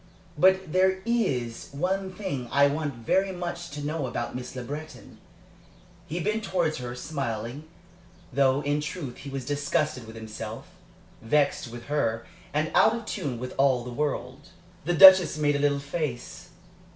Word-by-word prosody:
But 190 Hz, 0 st, +3 dB
there 190 Hz, 0 st, +3 dB
is 130 Hz, -, -1 dB
one 190 Hz, +5 st, -1 dB
thing 180 Hz, -11 st, -4 dB
I 140 Hz, 0 st, +5 dB
want 145 Hz, -1 st, -1 dB
very 190 Hz, +12 st, +1 dB
much 175 Hz, -1 st, -5 dB
to 145 Hz, 0 st, -6 dB
know 150 Hz, -2 st, -2 dB
about 120 Hz, 0 st, -4 dB
Miss 125 Hz, +1 st, -6 dB
Le 125 Hz, -, -4 dB
Breton." 145 Hz, -3 st, -8 dB, 0.9 s
He 170 Hz, +2 st, -3 dB
bent 215 Hz, +5 st, -1 dB
towards 170 Hz, -6 st, 0 dB
her, 125 Hz, -1 st, -5 dB
smiling, 125 Hz, -1 st, -4 dB, 0.7 s
though 135 Hz, +1 st, +3 dB
in 145 Hz, +1 st, 0 dB
truth 150 Hz, -4 st, -5 dB
he 140 Hz, -, -8 dB
was 135 Hz, -2 st, -5 dB
disgusted 145 Hz, -3 st, -1 dB
with 110 Hz, -, -10 dB
himself, 110 Hz, 0 st, -7 dB, 0.5 s
vexed 140 Hz, +3 st, +1 dB
with 120 Hz, +1 st, -9 dB
her, 115 Hz, -6 st, -1 dB, 0.3 s
and 155 Hz, +2 st, 0 dB
out 220 Hz, +1 st, +5 dB
of 230 Hz, -2 st, -6 dB
tune 135 Hz, -, -3 dB
with 125 Hz, +2 st, -6 dB
all 130 Hz, -3 st, +3 dB
the 125 Hz, -, -7 dB
world. 140 Hz, +2 st, -3 dB, 0.4 s
The 175 Hz, -, +1 dB
Duchess 190 Hz, -3 st, +9 dB
made 145 Hz, -1 st, +2 dB
a -, -, 0 dB
little 145 Hz, 0 st, +2 dB
face. 140 Hz, -3 st, -5 dB
145 Hz, 160 wpm, -27 LUFS, 125-175 Hz, 0.9 s, Duchess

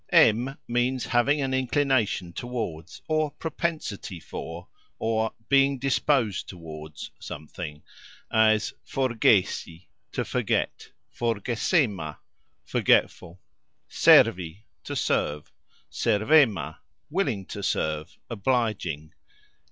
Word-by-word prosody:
" -, -, -43 dB
em 120 Hz, +5 st, +4 dB
" -, -, -51 dB
means 120 Hz, +1 st, 0 dB
having 140 Hz, +5 st, +2 dB
an 135 Hz, -1 st, -1 dB
"inclination 130 Hz, -8 st, +1 dB
towards" 115 Hz, -2 st, -5 dB
or 155 Hz, -1 st, +1 dB
"propensity" 155 Hz, -, -4 dB
for, 85 Hz, +2 st, -7 dB, 0.3 s
or 110 Hz, 0 st, 0 dB, 0.2 s
"being 140 Hz, 0 st, +4 dB
disposed 130 Hz, -5 st, +1 dB
towards" 80 Hz, -3 st, -9 dB
something 75 Hz, 0 st, -8 dB, 0.5 s
as 110 Hz, -1 st, +3 dB
"Forgesi", 110 Hz, -9 st, +1 dB, 0.2 s
to -, -, -1 dB
forget; -, -, -1 dB, 0.3 s
"forgesema", 115 Hz, -, 0 dB, 0.5 s
forgetful; 85 Hz, +3 st, +1 dB, 0.5 s
"Servi" 90 Hz, +4 st, +4 dB, 0.2 s
to -, -, -5 dB
serve; 75 Hz, 0 st, -1 dB, 0.4 s
"servema", 115 Hz, +1 st, +3 dB, 0.3 s
willing 135 Hz, -, 0 dB
to 100 Hz, -, -7 dB
serve, 80 Hz, -5 st, -2 dB
obliging. 100 Hz, -, -1 dB
110 Hz, 90 wpm, -26 LUFS, 90-130 Hz, 0.5 s, em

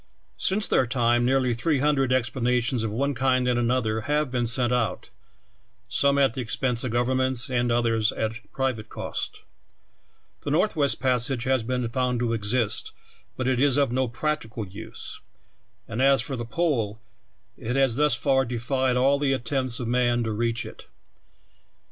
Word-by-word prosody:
Since 205 Hz, +2 st, +2 dB
their 130 Hz, -, +2 dB
time 120 Hz, -1 st, +2 dB
nearl}^ 130 Hz, -2 st, +2 dB
three 150 Hz, +5 st, +1 dB
hundred 135 Hz, -2 st, +1 dB
expeditions 125 Hz, -1 st, 0 dB
of 110 Hz, -, -1 dB
one 140 Hz, +7 st, -1 dB
kind 130 Hz, -1 st, +1 dB
and 120 Hz, -1 st, +2 dB
another 115 Hz, -2 st, 0 dB
have 150 Hz, -2 st, +1 dB
been 120 Hz, -2 st, 0 dB
sent 120 Hz, +1 st, +2 dB
out, 115 Hz, -3 st, -1 dB, 0.8 s
some 140 Hz, 0 st, +2 dB
at 135 Hz, -4 st, +3 dB
the 130 Hz, -, -3 dB
expense 120 Hz, 0 st, -1 dB
of 130 Hz, -, -2 dB
governments 130 Hz, +1 st, 0 dB
and 120 Hz, -1 st, +1 dB
others 115 Hz, -2 st, +2 dB
at 110 Hz, -1 st, -4 dB
private 130 Hz, -5 st, -2 dB
cost. -, -, -5 dB, 1.0 s
The -, -, -4 dB
Northwest 155 Hz, -3 st, +2 dB
Passage 130 Hz, -1 st, +1 dB
has 130 Hz, -1 st, +1 dB
been 125 Hz, +1 st, -2 dB
found 125 Hz, 0 st, 0 dB
to 115 Hz, -1 st, 0 dB
exist, 110 Hz, 0 st, -1 dB, 0.4 s
but 130 Hz, -, -2 dB
it 130 Hz, -2 st, +1 dB
is 140 Hz, -2 st, +3 dB
of 140 Hz, -4 st, +2 dB
no 130 Hz, +1 st, +1 dB
practical 120 Hz, -4 st, -3 dB
use; 100 Hz, +4 st, -8 dB, 0.7 s
and 115 Hz, -, -3 dB
as 135 Hz, 0 st, +5 dB
for 135 Hz, -, -4 dB
the 120 Hz, -1 st, -4 dB
Pole, 115 Hz, -8 st, -1 dB, 0.6 s
it 125 Hz, +3 st, -4 dB
has 135 Hz, -4 st, +3 dB
thus 150 Hz, -1 st, +4 dB
far 135 Hz, +3 st, +2 dB
defied 125 Hz, +1 st, -1 dB
all 135 Hz, +2 st, +3 dB
the 140 Hz, -2 st, +1 dB
attempts 130 Hz, -1 st, -1 dB
of 120 Hz, -, -3 dB
man 120 Hz, 0 st, +2 dB
to 110 Hz, -, -2 dB
reach 115 Hz, +2 st, -1 dB
it. -, -, -11 dB
125 Hz, 165 wpm, -25 LUFS, 115-135 Hz, 1.0 s, as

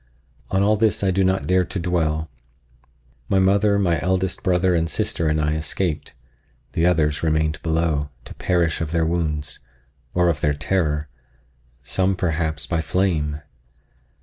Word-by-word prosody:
—on 95 Hz, +1 st, +2 dB
all 105 Hz, +1 st, +4 dB
this 110 Hz, -1 st, +1 dB
I 95 Hz, -, +3 dB
do 95 Hz, +1 st, +2 dB
not 95 Hz, +1 st, +1 dB
dare 90 Hz, 0 st, +3 dB
to 90 Hz, -, -5 dB
dwell. 80 Hz, -3 st, 0 dB, 1.0 s
My 95 Hz, -, +3 dB
mother, 100 Hz, +2 st, +3 dB
my 85 Hz, -6 st, +1 dB
eldest 95 Hz, +1 st, 0 dB
brother 90 Hz, 0 st, +2 dB
and 80 Hz, -1 st, +1 dB
sister 85 Hz, -, -1 dB
and 75 Hz, 0 st, +1 dB
I 75 Hz, 0 st, +1 dB
escaped; 80 Hz, +1 st, -2 dB, 0.6 s
the 85 Hz, +1 st, +2 dB
others 75 Hz, -4 st, +2 dB
remained 80 Hz, -1 st, 0 dB
below, 80 Hz, -3 st, 0 dB, 0.2 s
to -, -, -9 dB
perish 85 Hz, -3 st, 0 dB
of 80 Hz, -, -2 dB
their 80 Hz, 0 st, +1 dB
wounds, 80 Hz, -3 st, -2 dB, 0.6 s
or 90 Hz, 0 st, +3 dB
of 80 Hz, -4 st, 0 dB
their 75 Hz, -1 st, +2 dB
terror—some, 70 Hz, 0 st, -3 dB
perhaps, 80 Hz, -4 st, -1 dB
by 80 Hz, +3 st, -1 dB
flame. 75 Hz, -5 st, 0 dB
80 Hz, 150 wpm, -22 LUFS, 75-90 Hz, 1.0 s, all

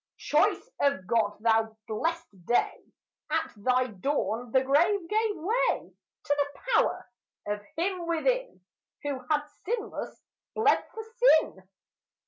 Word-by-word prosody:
Choice -, -, +1 dB
of 280 Hz, -10 st, +1 dB
God, 210 Hz, 0 st, +1 dB
thou 220 Hz, -1 st, +2 dB
blessed 215 Hz, -, -3 dB
day! 245 Hz, -, +1 dB, 0.5 s
At 320 Hz, 0 st, 0 dB
thy 255 Hz, +4 st, +2 dB
dawn 240 Hz, +1 st, -2 dB
the 260 Hz, +1 st, +4 dB
grave 335 Hz, +7 st, +2 dB
gave 430 Hz, +2 st, +1 dB
way 445 Hz, +10 st, 0 dB, 0.3 s
To 290 Hz, -, 0 dB
the 285 Hz, 0 st, -2 dB
power -, -, +2 dB, 0.4 s
of 205 Hz, 0 st, -2 dB, 0.2 s
him 355 Hz, 0 st, -1 dB
within, -, -, 0 dB, 0.4 s
Who 285 Hz, -2 st, -2 dB
had, 300 Hz, -1 st, +2 dB, 0.2 s
sinless, 440 Hz, +2 st, -4 dB, 0.4 s
bled 435 Hz, -1 st, +3 dB
for 445 Hz, -, -5 dB
sin. 435 Hz, -, +2 dB
290 Hz, 120 wpm, -28 LUFS, -, 0.5 s, the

